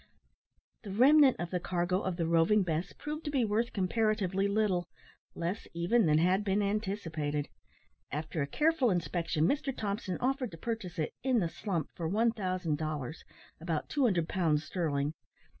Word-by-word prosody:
The 210 - -9
remnant 265 +6 +6
of 175 -1 -4
the 180 - 0
cargo 180 +1 0
of 185 -3 -2
the 170 - 0
Roving 170 +5 +4
Bess 170 +1 -2
proved 300 +2 -6
to - - -1
be 270 -5 +1
worth 220 +3 0
comparatively 200 -1 +1
little 200 -4 +1 0.5
less 175 +6 -3
even 180 +5 +3
than 150 0 +4
had 185 +5 +3
been 205 0 +1
anticipated. 170 -8 -2 0.6
After 155 +2 -3
a 140 - -1
careful 300 - +2
inspection, 165 -3 0
Mr 275 - 0
Thompson 200 -3 -2
offered 260 -1 0
to - - -8
purchase 220 -2 -4
it 155 - -2
"in 260 -2 +2
the 175 -7 +1
slump" 175 -5 -3
for 165 - -3
1000 185 -6 0
dollars 155 -2 -4 0.4
about 160 -2 -3
200 205 - +2
pounds 160 -6 +1
sterling. 150 -3 -1
185 Hz, 160 wpm, -31 LUFS, 165-220 Hz, 0.6 s, remnant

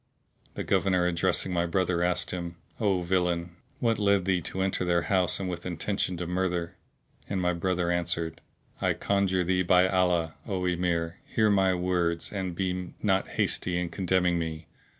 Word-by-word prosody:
The - - -3
Governor 90 -2 +2
addressing 90 +1 +1
my 85 0 +1
brother 90 0 +1
asked 90 0 +1
him, 85 -1 -4 0.2
"O 100 -5 +1
villain, 85 -1 0 0.2
what 115 -2 +1
led 100 -3 +3
thee 95 -2 +1
to 95 +2 -2
enter 95 -1 0
their 85 -1 +2
house 95 -3 +2
with 90 -3 -4
intention 90 +1 -2
to 90 - -3
murther?"; 90 -1 -1 0.6
and 100 - -1
my 90 -1 +1
brother 85 0 0
answered, 85 -2 -1 0.4
"I - - +2
conjure 95 -2 +1
thee 90 +1 +1
by 90 +1 +4
Allah, 90 -4 +1
O 95 -3 -2
Emir, 85 -1 0
hear 110 -2 +2
my 95 -2 +3
words 90 -1 -1
and 95 -3 -3
be 90 -1 -3
not 95 -2 +2
hasty 90 -1 +1
in 90 -1 -1
condemning 90 -2 +1
me!" 80 -1 -4
90 Hz, 165 wpm, -28 LUFS, 85-95 Hz, 0.6 s, by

